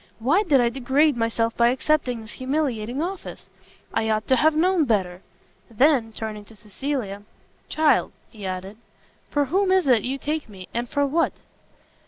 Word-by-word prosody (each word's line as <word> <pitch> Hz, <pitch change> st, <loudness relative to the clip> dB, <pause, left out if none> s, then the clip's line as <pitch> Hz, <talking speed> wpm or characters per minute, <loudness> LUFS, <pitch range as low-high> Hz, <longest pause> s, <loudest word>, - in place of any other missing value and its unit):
why 280 Hz, -, +2 dB
did 305 Hz, -10 st, +3 dB
I 240 Hz, -1 st, +3 dB
degrade 270 Hz, +4 st, +2 dB
myself 230 Hz, 0 st, 0 dB
by 235 Hz, -, +4 dB
accepting 255 Hz, -1 st, 0 dB
this 220 Hz, -, -10 dB
humiliating 260 Hz, -2 st, -2 dB
office? 375 Hz, +2 st, -7 dB, 0.4 s
I 220 Hz, -, 0 dB
ought 215 Hz, 0 st, 0 dB
to 260 Hz, -, +5 dB
have 310 Hz, +5 st, +3 dB
known 355 Hz, +1 st, +3 dB
better!" 190 Hz, -6 st, -1 dB, 0.5 s
Then, 245 Hz, 0 st, +3 dB
turning 215 Hz, -1 st, -6 dB
to 225 Hz, -, -15 dB
Cecilia, 210 Hz, 0 st, -4 dB, 0.5 s
"Child," 310 Hz, -1 st, +2 dB, 0.2 s
he 215 Hz, -4 st, -12 dB
added, 190 Hz, +2 st, -5 dB, 0.5 s
"for 290 Hz, -1 st, +1 dB
whom 375 Hz, +7 st, +1 dB
is 375 Hz, -1 st, +3 dB
it 245 Hz, -5 st, +4 dB
you 260 Hz, +4 st, -3 dB
take 300 Hz, -1 st, -3 dB
me, 190 Hz, -3 st, -11 dB
and 240 Hz, +1 st, -3 dB
for 285 Hz, -1 st, +1 dB
what?" 320 Hz, +4 st, +1 dB
250 Hz, 165 wpm, -24 LUFS, 220-300 Hz, 0.5 s, to